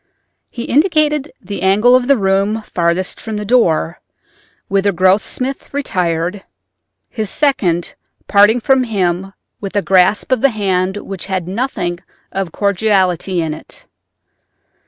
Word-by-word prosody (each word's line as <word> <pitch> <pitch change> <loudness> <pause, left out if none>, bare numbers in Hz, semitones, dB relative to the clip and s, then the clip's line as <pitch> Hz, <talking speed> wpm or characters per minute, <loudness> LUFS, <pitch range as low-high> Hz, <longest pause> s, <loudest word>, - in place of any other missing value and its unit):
He 235 - -6
indicated 300 -1 +1
the 200 +2 -7
angle 210 +6 +4
of 250 -1 +2
the 280 -1 +4
room 200 +2 0
farthest 175 0 -1
from 220 -2 -5
the 210 - -4
door, 175 - +2 0.7
whither 200 +1 +1
Grossmith 195 +8 0
retired, 180 - -1 0.6
his 215 -4 -4
second 195 - 0 0.3
parting 210 +3 +5
from 260 +2 +2
him 190 -3 -1 0.3
with 195 -1 -6
a 205 - +1
grasp 190 +5 +2
of 255 -3 +2
the 275 - +5
hand 190 -3 -1
which 195 -3 -7
had 185 -3 -2
nothing 185 -5 -2 0.3
of 195 -3 -3
cordiality 190 -3 +1
in 155 -1 -2
it. 155 - -12
200 Hz, 130 wpm, -16 LUFS, 185-235 Hz, 0.7 s, parting